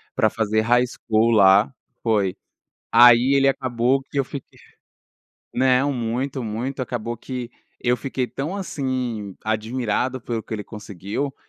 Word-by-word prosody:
pra 110 -4 +3
fazer 110 0 0
High 120 +2 +3
School 115 -1 +1
lá 100 0 +6 0.3
foi 105 -5 +1 0.5
aí 120 +3 +7
ele 135 0 +4
acabou 130 0 +1
que 140 +1 -8
eu 135 - +2
fui 140 +1 -6
que - - -25 1.0
Não, 130 +2 +3
muito, 125 +3 -2
muito. 120 +5 -4
Acabou 120 -2 -3
que 125 0 -6 0.3
eu 125 0 +2
fiquei 130 0 -3
tão 150 +8 -4
assim, 125 - -3
admirado 115 +3 -1
pelo 115 -1 -3
que 110 - -6
ele 105 - -4
conseguiu, 105 +6 -5
120 Hz, 140 wpm, -22 LUFS, 110-130 Hz, 1.0 s, aí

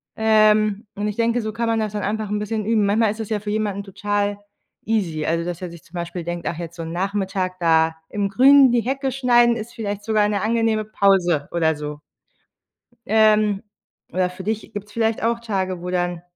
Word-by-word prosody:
Ähm, 215 -1 +3
und 205 +1 -2
ich 210 - -3
denke, 230 +1 +1
so 215 0 -4
kann 230 0 -2
man 225 -1 +1
das 215 -1 -2
dann 205 - -3
einfach 215 +1 -2
'n 210 - -1
bisschen 210 0 -3
üben. 215 -2 +2
Manchmal 210 +1 +2
ist 220 - -8
das 220 -1 -5
ja 215 - 0
für 210 0 -6
jemanden 205 -2 -2
total 205 +1 -2 0.5
easy 180 -9 -1
also 170 +1 0
dass 175 0 -5
er 180 - -4
sich 170 -1 -13
zum 170 - -17
Beispiel 170 0 -4
denkt: 175 0 -4
„Ach 165 - -3
jetzt 170 0 -7
so 170 - -7
'n 165 - -6
Nachmittag 190 0 -2
da 160 -1 +3
im 200 -1 -1
Grünen 265 +4 +6
die 240 -1 +2
Hecke 265 +3 -2
schneiden, 240 -2 +4
ist 230 +1 -7
vielleicht 205 -2 -4
sogar 215 -1 +2
'ne 200 -2 -1
angenehme 225 -1 +1
Pause." 185 -8 +2
Oder 160 -2 +1
so. 150 0 -6 1.1
Ähm, 215 -1 +3 0.5
oder 180 +1 0
für 185 +1 -9
dich 220 +2 -3
gibt's 205 0 -7
vielleicht 225 -1 0
auch 235 0 +1
Tage, 190 -6 -3
wo 180 - -5
dann 175 -1 -1
205 Hz, 210 wpm, -22 LUFS, 180-220 Hz, 1.1 s, Grünen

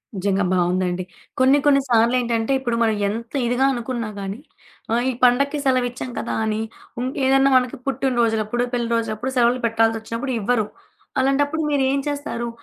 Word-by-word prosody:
నిజంగా 195 +1 0
బావుందండి. 180 0 0 0.4
కొన్ని 260 +2 +5
కొన్ని 280 -1 +5
సార్లేంటంటే 235 0 +2
ఇప్పుడు 240 -3 -2
మనం 220 -1 +2
ఎంత 230 +4 -5
ఇదిగా 245 +3 +2
అనుకున్నా 235 -2 -3
గానీ, 195 +3 -5 0.5
ఆ 230 - +3 0.2
ఈ - - -5
పండగకి 280 +4 +3
సెలవిచ్చాం 250 -1 0
కదా! - - -3
అని 215 0 -1 0.4
ఉ - - -2 0.2
ఏదన్నా 270 +1 +4
మనకి 250 +2 -1
పుట్టినరోజులప్పుడు, 240 -3 0
పెళ్లి 240 -1 -1
రోజులప్పుడు, 230 +3 -2
సెలవులు 245 +1 +3
పెట్టాల్సొచ్చినప్పుడు 225 +3 -1
ఇవ్వరు. 220 0 +1 0.5
అలాంటప్పుడు 285 +4 +1
మీరేం 275 -1 +1
చేస్తారు? 285 -5 -3
240 Hz, 140 wpm, -22 LUFS, 225-265 Hz, 0.5 s, కొన్ని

